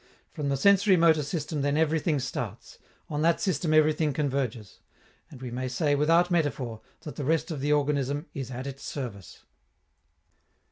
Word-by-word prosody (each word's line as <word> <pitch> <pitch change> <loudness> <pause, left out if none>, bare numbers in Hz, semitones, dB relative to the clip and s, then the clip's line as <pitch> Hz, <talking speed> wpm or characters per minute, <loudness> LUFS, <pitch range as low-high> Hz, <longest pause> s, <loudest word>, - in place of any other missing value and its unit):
From 145 -2 -3
the 140 - +1
sensori 200 +5 +4
motor 165 -2 +4
system, 155 0 -3
then, 145 +1 +1
everything 160 0 +1
starts; 130 - -5 0.3
on 150 0 -3
that 165 +1 +3
system 175 -3 0
everything 155 -1 +3
converges; 130 -7 -3 0.5
and 135 - -12
we 125 - -5
may 130 +2 -3
say, 145 +3 0
without 165 +5 +3
metaphor, 135 -9 -1 0.2
that 150 - -9
the 145 - -3
rest 160 +4 0
of 150 - -4
the 145 +2 0
organism 145 0 0
is 135 -3 -5
at 130 +1 -6
its 140 0 -7
service. 115 - -7
145 Hz, 160 wpm, -27 LUFS, 135-160 Hz, 0.5 s, sensori